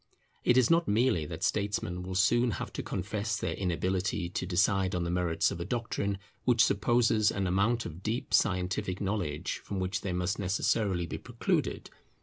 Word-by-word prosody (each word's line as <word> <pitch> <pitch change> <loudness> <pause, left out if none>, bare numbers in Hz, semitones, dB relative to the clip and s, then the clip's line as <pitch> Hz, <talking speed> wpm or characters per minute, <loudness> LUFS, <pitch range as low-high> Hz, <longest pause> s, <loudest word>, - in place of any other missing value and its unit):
It 120 - +4
is 130 +1 +4
not 170 0 +4
merely 110 - +2
that - - -6
statesmen 100 -3 -1
will 90 +1 -5
soon 120 +6 +3
have - - -6
to - - -3
confess 105 +3 -2
their - - -2
inability 95 0 -1
to 90 - -3
decide 95 +1 +2
on 90 - 0
the 85 - -2
merits 90 -2 +1
of - - -5
a - - -2
doctrine 100 -2 -2 0.3
which 120 -3 +4
supposes 110 +1 +3
an 100 -1 -1
amount 100 +6 +1
of 80 +3 -7
deep 110 +4 -3
scientific 95 -1 +1
knowledge 95 -7 -2
from 100 - -4
which 95 +1 -2
they 100 - -3
must 90 +2 -1
necessarily 95 -1 +1
be - - -5
precluded. - - -2
100 Hz, 175 wpm, -30 LUFS, 90-110 Hz, 0.3 s, It